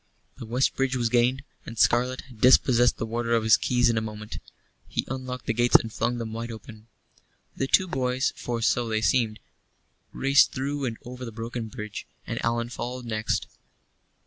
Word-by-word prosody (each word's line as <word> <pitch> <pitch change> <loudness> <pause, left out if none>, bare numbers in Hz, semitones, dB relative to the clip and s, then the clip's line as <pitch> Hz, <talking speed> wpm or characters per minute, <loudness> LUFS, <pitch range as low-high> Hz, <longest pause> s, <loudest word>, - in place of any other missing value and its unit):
The 115 - -7
west 125 +4 +1
bridge 135 -1 0
was 120 -2 0
gained, 125 +3 +2 0.2
and 115 - -9
Scarlett 125 +4 +2
had 120 -5 -17
dispossessed 125 -1 +5
the - - -2
warder 115 +1 -1
of 115 - +1
his 110 +1 +6
keys 125 0 +2
in 115 -1 +2
a - - -4
moment. 105 -1 -7 0.5
He - - -2
unlocked 130 -1 -5
the 115 - 0
gates 120 +2 +2
and 110 -2 +5
flung 120 +2 -1
them 115 -2 -5
wide 115 +1 -4
open. 110 0 -11 0.7
The 135 - -1
two 185 +6 +4
boys 130 -4 0
for 120 -1 -3
so 120 +1 +1
they 110 0 0
seemed 110 -3 +1 0.7
raced 135 +1 +4
through 140 +1 -2
and 115 -3 -3
over 125 +1 -8
the 115 - -6
broken 115 +1 -5
bridge, 105 -3 -7 0.2
and - - -4
Allan 115 0 0
followed 125 0 -5
next. 110 -1 -1
120 Hz, 185 wpm, -26 LUFS, 115-125 Hz, 0.7 s, his